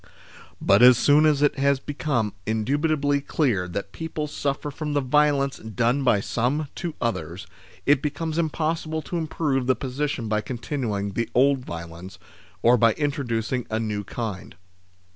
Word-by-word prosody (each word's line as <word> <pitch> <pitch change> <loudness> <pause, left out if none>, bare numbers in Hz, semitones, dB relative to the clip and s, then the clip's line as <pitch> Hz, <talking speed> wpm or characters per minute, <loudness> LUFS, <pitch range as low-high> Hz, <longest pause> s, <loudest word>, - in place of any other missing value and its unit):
But 100 +1 +4
as 125 -1 +8
soon 150 +4 +5
as 150 -1 +2
it 145 -1 +2
has 140 0 +3
become 135 -7 -2
indubitably 145 +6 +1
clear 120 - 0
that 100 +2 -5
people 160 +1 -4
suffer 145 0 -3
from 150 +1 -4
the 145 - +2
violence 140 0 +2
done 115 +5 0
by 105 -6 +3
some 130 +8 -1
to 170 -4 -4
others, 95 -5 -3 0.4
it 140 -1 +4
becomes 160 +2 -2
impossible 160 0 -1
to 175 - -4
im 160 - -3
prove 135 -5 -1
the 130 - +4
position 130 -1 -3
by 105 0 0
continuing 115 -5 -3
the 115 +4 -2
old 135 +2 +4
violence, 85 +3 -8 0.5
or 120 +1 +6
by 115 -1 +4
introducing 125 -5 -2
a 110 - -1
new 105 -2 -2
kind. 105 -6 -6
135 Hz, 155 wpm, -24 LUFS, 110-150 Hz, 0.5 s, as